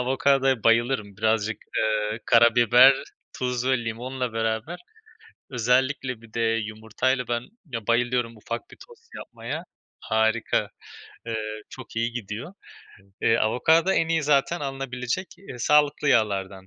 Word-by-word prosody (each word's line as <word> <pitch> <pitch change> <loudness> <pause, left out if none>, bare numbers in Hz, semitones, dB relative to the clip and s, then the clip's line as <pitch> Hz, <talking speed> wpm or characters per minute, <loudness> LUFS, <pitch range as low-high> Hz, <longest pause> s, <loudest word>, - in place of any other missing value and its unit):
avokadoya 135 -1 +2
bayılırım. 115 -3 +2
Birazcık, 110 0 0 0.2
eee, 110 0 0
karabiber, 120 +2 +6 0.4
tuz 125 -1 -2
ve 130 -2 +3
limonla 125 +2 -4
beraber 110 +9 -2 0.7
özellikle 125 0 0
bir 115 -1 -17
de 115 - -2 0.2
yumurtayla 110 +4 -2
ben, 120 0 -1 0.2
ya, 115 -8 -6
bayılıyorum 120 -1 0
ufak 115 +2 -5
bir - - -14
tost 460 -1 -19
yapmaya. - - -6 0.4
Harika. 110 +1 0 0.6
Eee, 110 -1 -4
çok 130 -3 -11
iyi 115 +1 0
gidiyor. 120 - -6 0.7
Eee, 115 - +4
avokado 160 +11 +3
en 165 - +1
iyi 165 -1 +1
zaten 150 +4 +2
alınabilecek 135 +3 -3 0.3
sağlıklı 150 +3 +3
yağlardan. 95 -4 +1
120 Hz, 120 wpm, -25 LUFS, 110-135 Hz, 0.7 s, karabiber